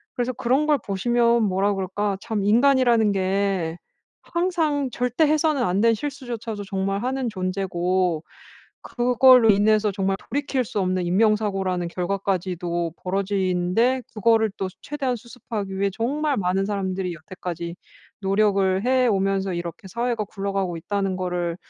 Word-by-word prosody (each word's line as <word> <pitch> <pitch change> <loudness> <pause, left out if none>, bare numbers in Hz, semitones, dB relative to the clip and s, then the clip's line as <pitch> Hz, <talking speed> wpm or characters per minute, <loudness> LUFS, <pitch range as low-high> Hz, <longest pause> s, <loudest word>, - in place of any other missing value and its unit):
그래서 245 +1 -1
그런 260 +5 +1
걸 300 - +4
보시면 235 +3 +2
뭐라 195 +1 +1
그럴까? 195 +1 -2
참 220 -4 -2
인간이라는 235 -1 +4
게 190 -3 0 0.5
항상 325 -6 0
절대 250 +6 +1
해서는 305 -3 +2
안 195 -1 +1
될 230 -1 +4
실수조차도 235 -5 -5
정말 195 +2 -2
하는 260 0 -1
존재고 185 -3 -1 0.6
그걸로 250 -1 +5
인해서 210 +1 +3
정말 195 0 0
돌이킬 275 -2 -1
수 210 -2 -3
없는 185 -1 0
인명 210 +4 +3
사고라는 190 -4 -2
결과까지도 180 -2 -2
벌어지는데 195 +5 0
그거를 220 0 +3
또 190 - -1 0.2
최대한 275 -4 -2
수습하기 220 -4 -6
위해 200 0 +1
정말 285 +4 -1
많은 190 0 0
사람들이 190 -3 -2
여태까지 170 +1 -7 0.4
노력을 195 0 +2
해 255 -1 +3
오면서 195 -1 0
이렇게 170 +2 -6
사회가 235 +2 -1
굴러가고 195 -3 -3
있다는 195 +2 -2
거를 175 -2 -2
200 Hz, 330 characters per minute, -23 LUFS, 185-240 Hz, 0.6 s, 그걸로